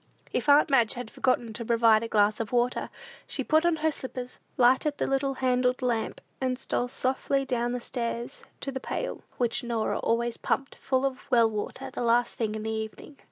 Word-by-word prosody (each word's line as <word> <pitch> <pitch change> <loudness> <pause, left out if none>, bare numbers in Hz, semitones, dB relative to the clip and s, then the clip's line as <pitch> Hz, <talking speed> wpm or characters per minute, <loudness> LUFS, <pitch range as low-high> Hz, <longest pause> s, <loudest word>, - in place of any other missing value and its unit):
If - - 0
aunt 290 +1 +6
Madge 240 -3 +4
had 245 -2 -6
forgotten 240 -3 0
to 235 - -5
provide 230 -1 +4
a 230 - -3
glass 210 -1 +3
of 225 -2 -3
water, 245 0 +1 0.4
she - - -2
put 315 +2 +3
on 340 - +3
her 315 - +4
slippers, 255 -2 -6 0.2
lighted 260 +4 +4
the - - 0
little 270 0 0
handled 250 0 +1
lamp, 235 -3 -1 0.2
and 255 -1 0
stole 245 -1 -1
softly 265 +2 0
down 245 -1 -1
stairs 235 - -4 0.2
to 275 - -3
the 265 - -4
pail, - - -4 0.2
which 240 +1 0
Norah 235 -2 -1
always 235 0 0
pumped 270 +1 -1
full 260 0 0
of 265 -1 -1
well 230 -3 +4
water 260 +5 -5
the 275 - -5
last 240 0 +2
thing 220 -2 -2
in 215 - -4
the 220 - -2
evening. 220 +6 -6
245 Hz, 195 wpm, -28 LUFS, 230-265 Hz, 0.4 s, aunt